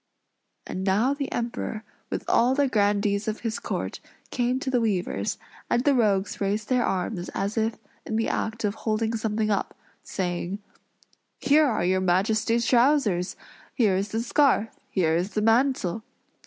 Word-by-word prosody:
And 185 Hz, -, -4 dB
now 210 Hz, +8 st, +2 dB
the 280 Hz, -1 st, -4 dB
Emperor, 230 Hz, -2 st, -3 dB, 0.3 s
with -, -, -4 dB
all 245 Hz, +3 st, +3 dB
the 285 Hz, 0 st, +3 dB
grandees 205 Hz, -2 st, +1 dB
of 215 Hz, 0 st, -3 dB
his 225 Hz, -2 st, -2 dB
court, -, -, -4 dB, 0.3 s
came 250 Hz, +1 st, 0 dB
to 260 Hz, -, -2 dB
the 250 Hz, -2 st, +2 dB
weavers; 200 Hz, -6 st, -1 dB, 0.3 s
and 240 Hz, -, +2 dB
the 285 Hz, -, +4 dB
rogues 205 Hz, -6 st, +1 dB
raised 205 Hz, +2 st, -1 dB
their 250 Hz, -1 st, +3 dB
arms, 185 Hz, -1 st, -2 dB
as 200 Hz, +2 st, -1 dB
if 225 Hz, 0 st, 0 dB, 0.3 s
in 220 Hz, -, -4 dB
the 225 Hz, -, +1 dB
act 220 Hz, +1 st, -2 dB
of 205 Hz, -1 st, +1 dB
holding 220 Hz, +1 st, -1 dB
something 220 Hz, -1 st, -1 dB
up, 200 Hz, -, -2 dB, 0.2 s
saying, 180 Hz, 0 st, -3 dB, 0.8 s
"Here 300 Hz, +1 st, +4 dB
are 220 Hz, -8 st, 0 dB
your 185 Hz, +1 st, +2 dB
Majesty's 215 Hz, +6 st, +2 dB
trousers! 235 Hz, -8 st, +3 dB, 0.4 s
Here 215 Hz, -7 st, +3 dB
is 195 Hz, +2 st, 0 dB
the 225 Hz, +2 st, -2 dB
scarf! 255 Hz, -4 st, +3 dB, 0.2 s
Here 165 Hz, -4 st, +1 dB
is 185 Hz, +3 st, -2 dB
the 210 Hz, -, +1 dB
mantle! 225 Hz, -4 st, +2 dB
220 Hz, 160 wpm, -26 LUFS, 195-240 Hz, 0.8 s, the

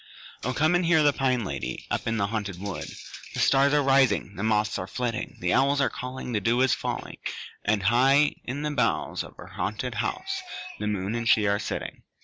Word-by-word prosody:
O 125 Hz, -, 0 dB
come 155 Hz, +6 st, +2 dB
and 175 Hz, +1 st, +3 dB
hear 165 Hz, -2 st, +4 dB
the 145 Hz, -1 st, +5 dB
Pine 130 Hz, -5 st, +1 dB
Lady -, -, -4 dB
Up -, -, -1 dB
in 115 Hz, 0 st, 0 dB
the 100 Hz, -, +1 dB
haunted 100 Hz, -3 st, -3 dB
wood! 100 Hz, -1 st, -5 dB, 0.5 s
The -, -, -2 dB
stars 140 Hz, +1 st, +4 dB
are 145 Hz, -, +3 dB
rising, 135 Hz, -6 st, +3 dB
the 100 Hz, -, -5 dB
moths 105 Hz, -1 st, +1 dB
are 90 Hz, -, -4 dB
flitting, 120 Hz, +1 st, -3 dB
The 90 Hz, 0 st, +1 dB
owls 140 Hz, +1 st, +3 dB
are 140 Hz, -, +2 dB
calling, 125 Hz, 0 st, -6 dB
The 105 Hz, -3 st, 0 dB
dew 115 Hz, +4 st, +2 dB
is 130 Hz, -1 st, +4 dB
falling; -, -, -4 dB, 0.5 s
And, 105 Hz, -2 st, +2 dB
high 135 Hz, +7 st, +4 dB
in 135 Hz, +4 st, -4 dB
the 150 Hz, -, -1 dB
boughs 145 Hz, -, 0 dB
Of -, -, -12 dB
her -, -, -10 dB
haunted -, -, -3 dB
house, 390 Hz, 0 st, -3 dB, 0.4 s
The 105 Hz, -, -2 dB
moon 100 Hz, 0 st, -1 dB
and 115 Hz, 0 st, -1 dB
she 105 Hz, -, +5 dB
are 100 Hz, 0 st, +2 dB
sitting. -, -, -5 dB
120 Hz, 210 wpm, -26 LUFS, 105-140 Hz, 0.5 s, the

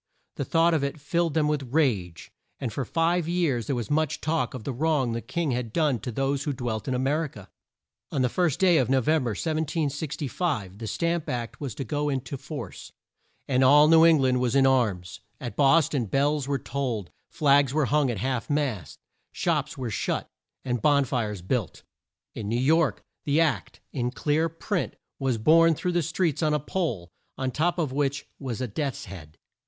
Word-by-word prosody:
The -, -, -2 dB
thought 165 Hz, 0 st, +3 dB
of 155 Hz, -3 st, +1 dB
it 140 Hz, +2 st, -3 dB
filled 165 Hz, +2 st, 0 dB
them 155 Hz, -2 st, +3 dB
with 140 Hz, -5 st, -2 dB
rage; 105 Hz, -, 0 dB, 0.3 s
and 120 Hz, -5 st, -3 dB
for 135 Hz, +2 st, -2 dB
five 165 Hz, +4 st, +1 dB
years 160 Hz, -, 0 dB
there 140 Hz, -, 0 dB
was 120 Hz, -1 st, -4 dB
much 155 Hz, -1 st, +1 dB
talk 140 Hz, -6 st, -1 dB
of 125 Hz, -, -7 dB
the 135 Hz, -, -3 dB
wrong 145 Hz, -2 st, +1 dB
the 115 Hz, 0 st, -3 dB
king 170 Hz, +1 st, -2 dB
had 120 Hz, -2 st, -2 dB
done 150 Hz, -4 st, +1 dB
to 120 Hz, -, -5 dB
those 135 Hz, +3 st, -1 dB
who 145 Hz, -, -1 dB
dwelt 120 Hz, -3 st, -4 dB
in 130 Hz, -, 0 dB
A -, -, +1 dB
mer 145 Hz, +5 st, +1 dB
i -, -, -4 dB
ca. 105 Hz, -8 st, -13 dB, 0.6 s
On 135 Hz, -, 0 dB
the -, -, +3 dB
first 165 Hz, +2 st, 0 dB
day 180 Hz, -3 st, +5 dB
of 125 Hz, -3 st, +1 dB
No 135 Hz, 0 st, +4 dB
vem 155 Hz, +1 st, +1 dB
ber, 110 Hz, -3 st, -1 dB
1765, 150 Hz, -, -2 dB
the 115 Hz, -, -5 dB
Stamp 170 Hz, +5 st, -1 dB
Act 120 Hz, +2 st, -4 dB
was 135 Hz, -7 st, -4 dB
to 135 Hz, -, -4 dB
go 145 Hz, +5 st, -1 dB
in 135 Hz, -2 st, 0 dB
to 130 Hz, +2 st, -7 dB
force, 135 Hz, -, -8 dB, 0.6 s
and 130 Hz, -1 st, +2 dB
all 145 Hz, +3 st, +7 dB
New 160 Hz, 0 st, +7 dB
Eng 165 Hz, -1 st, +7 dB
land 130 Hz, -2 st, +2 dB
was 125 Hz, 0 st, 0 dB
in 135 Hz, -1 st, +5 dB
arms. 110 Hz, -10 st, +1 dB, 0.2 s
At 120 Hz, -, -6 dB
Bos 145 Hz, +2 st, +5 dB
ton 130 Hz, -6 st, -1 dB
bells 140 Hz, +4 st, +1 dB
were 140 Hz, -1 st, 0 dB
tolled; 120 Hz, -7 st, -3 dB, 0.2 s
flags 140 Hz, -4 st, +3 dB
were 150 Hz, 0 st, +1 dB
hung 145 Hz, 0 st, +2 dB
at 120 Hz, -, -2 dB
half 125 Hz, +3 st, -2 dB
mast; 130 Hz, -, -2 dB, 0.3 s
shops -, -, -1 dB
were 125 Hz, -4 st, -4 dB
shut, -, -, -2 dB, 0.4 s
and 120 Hz, -3 st, -1 dB
bon 145 Hz, -2 st, +4 dB
fires 105 Hz, -8 st, -2 dB
built. 110 Hz, 0 st, -2 dB, 0.5 s
In 105 Hz, -2 st, -5 dB
New 120 Hz, +2 st, 0 dB
York, 150 Hz, 0 st, +2 dB, 0.2 s
the 145 Hz, +2 st, +2 dB
Act 145 Hz, -11 st, 0 dB
in 125 Hz, -3 st, -1 dB
clear 150 Hz, +5 st, 0 dB
print 170 Hz, +3 st, -3 dB, 0.2 s
was 135 Hz, -4 st, 0 dB
borne 165 Hz, +7 st, +5 dB
through 180 Hz, -, -2 dB
the 175 Hz, 0 st, +1 dB
streets 165 Hz, 0 st, -1 dB
on 155 Hz, -1 st, +2 dB
a -, -, +1 dB
pole, 130 Hz, -, -3 dB, 0.3 s
on 130 Hz, -1 st, -2 dB
top 175 Hz, +7 st, 0 dB
of 155 Hz, -6 st, -1 dB
which 140 Hz, +1 st, -1 dB
was 130 Hz, -3 st, -4 dB
a 130 Hz, -, -1 dB
death's 135 Hz, +4 st, -3 dB
head. 80 Hz, -5 st, -11 dB
140 Hz, 205 wpm, -26 LUFS, 120-155 Hz, 0.6 s, all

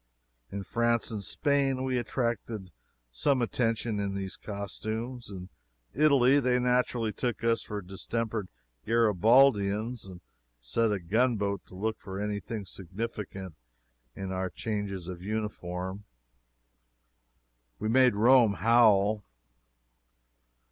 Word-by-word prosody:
In 100 Hz, 0 st, -4 dB
France 115 Hz, +2 st, 0 dB
and 105 Hz, -2 st, -3 dB
Spain 135 Hz, -, +1 dB
we 130 Hz, -1 st, 0 dB
attracted 115 Hz, -5 st, -3 dB, 0.4 s
some 130 Hz, -, +2 dB
attention 115 Hz, -2 st, 0 dB
in 100 Hz, -1 st, -2 dB
these 95 Hz, -1 st, -3 dB
costumes. 110 Hz, +4 st, -5 dB
In 95 Hz, -2 st, -8 dB, 0.4 s
Italy 140 Hz, -2 st, +5 dB
they 125 Hz, -2 st, +2 dB
naturally 125 Hz, -3 st, +1 dB
took 120 Hz, 0 st, -3 dB
us 115 Hz, 0 st, +2 dB
for 105 Hz, -2 st, -5 dB
distempered 105 Hz, +2 st, -3 dB, 0.4 s
Garibaldians, 110 Hz, 0 st, +3 dB
and 90 Hz, -2 st, -11 dB, 0.4 s
set 85 Hz, -, +1 dB
a 100 Hz, -, 0 dB
gunboat 100 Hz, +1 st, 0 dB
to -, -, -13 dB
look 110 Hz, +3 st, -2 dB
for 95 Hz, 0 st, -7 dB
any 105 Hz, 0 st, -2 dB
thing 105 Hz, -1 st, -6 dB
significant 95 Hz, 0 st, -6 dB, 0.6 s
in 95 Hz, -1 st, -5 dB
our 95 Hz, 0 st, -2 dB
changes 100 Hz, -5 st, -4 dB
of 90 Hz, -2 st, -7 dB
uniform. 95 Hz, -2 st, -4 dB, 1.7 s
We 110 Hz, -, -3 dB
made 125 Hz, 0 st, +5 dB
Rome 115 Hz, 0 st, +5 dB
howl. 110 Hz, -3 st, +4 dB
110 Hz, 115 wpm, -29 LUFS, 100-120 Hz, 1.7 s, Italy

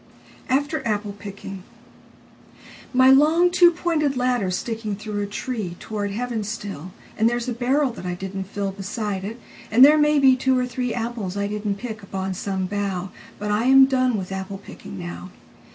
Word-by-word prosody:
10. 260 Hz, -, +5 dB
After 290 Hz, -1 st, -3 dB
Apple 210 Hz, -1 st, -1 dB
picking 200 Hz, -1 st, -8 dB, 1.3 s
MY 260 Hz, 0 st, +6 dB
long 315 Hz, +6 st, +5 dB
two 355 Hz, -1 st, +7 dB
pointed 320 Hz, -5 st, 0 dB
ladder's 245 Hz, -8 st, +1 dB
sticking 220 Hz, -3 st, -4 dB
through 210 Hz, 0 st, -4 dB
a 205 Hz, -, -2 dB
treeToward 205 Hz, -2 st, -4 dB
heaven 230 Hz, +1 st, -3 dB
still, 200 Hz, -5 st, -6 dB, 0.3 s
And 225 Hz, +1 st, +5 dB
there's 240 Hz, 0 st, -2 dB
a 245 Hz, -, -1 dB
barrel 260 Hz, +3 st, +1 dB
that 230 Hz, -, -9 dB
I 180 Hz, -, -2 dB
didn't 190 Hz, +1 st, -6 dB
fillBeside 200 Hz, 0 st, -3 dB
it, 220 Hz, +5 st, -6 dB, 0.3 s
and 245 Hz, +5 st, +8 dB
there 305 Hz, +2 st, +6 dB
may 300 Hz, 0 st, +4 dB
be 265 Hz, -2 st, +6 dB
two 260 Hz, 0 st, +2 dB
or 250 Hz, -, +1 dB
threeApples 235 Hz, -5 st, -3 dB
I 200 Hz, -, 0 dB
didn't 210 Hz, 0 st, -2 dB
pick 220 Hz, +1 st, -7 dB
upon 190 Hz, -1 st, -4 dB
some 190 Hz, 0 st, -2 dB
bough. 195 Hz, -2 st, -3 dB, 0.3 s
But 210 Hz, 0 st, -3 dB
I 210 Hz, +3 st, +1 dB
am 265 Hz, +1 st, +8 dB
done 255 Hz, -3 st, +1 dB
with 190 Hz, -1 st, -5 dB
apple 190 Hz, +1 st, -4 dB
picking 190 Hz, -, -11 dB
now. 85 Hz, 0 st, -7 dB
215 Hz, 170 wpm, -23 LUFS, 195-255 Hz, 1.3 s, and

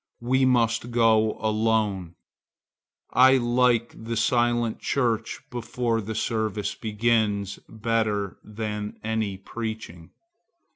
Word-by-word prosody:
We 130 Hz, +2 st, +3 dB
must 120 Hz, -2 st, +2 dB
go 110 Hz, -2 st, +3 dB
alone. 110 Hz, -5 st, 0 dB, 1.0 s
I 130 Hz, +2 st, +6 dB
like 120 Hz, -1 st, +2 dB
the 115 Hz, 0 st, -3 dB
silent 120 Hz, 0 st, +1 dB
church 115 Hz, -4 st, -1 dB
before 120 Hz, -1 st, -1 dB
the 110 Hz, +2 st, -5 dB
service 110 Hz, -2 st, -1 dB
begins, 105 Hz, -3 st, 0 dB
better 110 Hz, -3 st, -1 dB
than 105 Hz, -1 st, -5 dB
any 110 Hz, -3 st, -1 dB
preaching. 110 Hz, -5 st, -6 dB
110 Hz, 95 wpm, -25 LUFS, 105-120 Hz, 1.0 s, I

